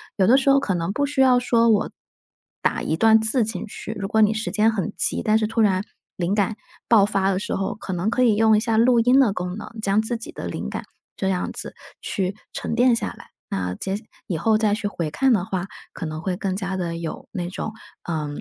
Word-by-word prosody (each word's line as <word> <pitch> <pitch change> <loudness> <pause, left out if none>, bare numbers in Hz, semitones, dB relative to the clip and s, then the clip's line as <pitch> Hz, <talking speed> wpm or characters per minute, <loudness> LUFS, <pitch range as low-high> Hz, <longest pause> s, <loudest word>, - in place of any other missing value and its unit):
有 190 -3 +3
的 250 +5 +6
时 275 0 +3
候 275 - +5
可 205 -9 -1
能 170 +3 -2
不 285 +4 0
需 285 -1 0
要 255 -2 +5
说 235 -2 +3
我 215 -1 +2 0.7
打 - - 0
一 160 - 0
段 220 +5 +5
字 220 +3 +2
进 210 -4 -4
去， 215 +1 -7
如 195 - -2
果 220 +2 +2
你 210 0 +5
时 220 - -3
间 220 +1 +3
很 205 -2 -3
急， - - 0
但 220 -1 +3
是 215 - 0
突 225 +1 0
然 190 -3 +3 0.4
灵 180 +2 0
感 210 +1 +1 0.3
爆 225 -4 +6
发 195 -1 +1
的 185 - 0
时 - - -3
候， 195 - -2
可 200 -2 -6
能 180 +5 -1
可 255 - +1
以 230 -4 +4
用 220 0 +4
一 - - +4
下 225 0 0
录 235 +1 +5
音 250 +4 +5
的 240 -7 +4
功 180 0 -4
能， - - -7
将 200 0 +2
自 235 +2 -2
己 225 - -8
的 - - -7
灵 - - -4
感， - - -5 0.3
这 190 - 0
样 180 -2 -1
子 - - -7 0.3
去 190 0 -2 0.2
沉 - - -3
淀 245 0 +4
下 - - -2
来。 - - -14 0.2
那 90 -1 -3
接 190 - -3
下 210 - -7 0.2
以 175 - -2
后 220 +5 +3
再 215 -2 +2
去 210 0 -2
回 170 -6 -3
看 265 - +2
的 200 -6 +2
话， 190 -1 -3 0.3
可 - - -5
能 155 0 -5
会 185 +1 -2
更 190 0 -2
加 190 -1 -3
地 170 -3 -3
有 165 -1 -6
那 180 -4 -3
种， 215 +4 -5 0.3
呃， 155 -3 -3
210 Hz, 265 characters per minute, -23 LUFS, 185-225 Hz, 0.7 s, 的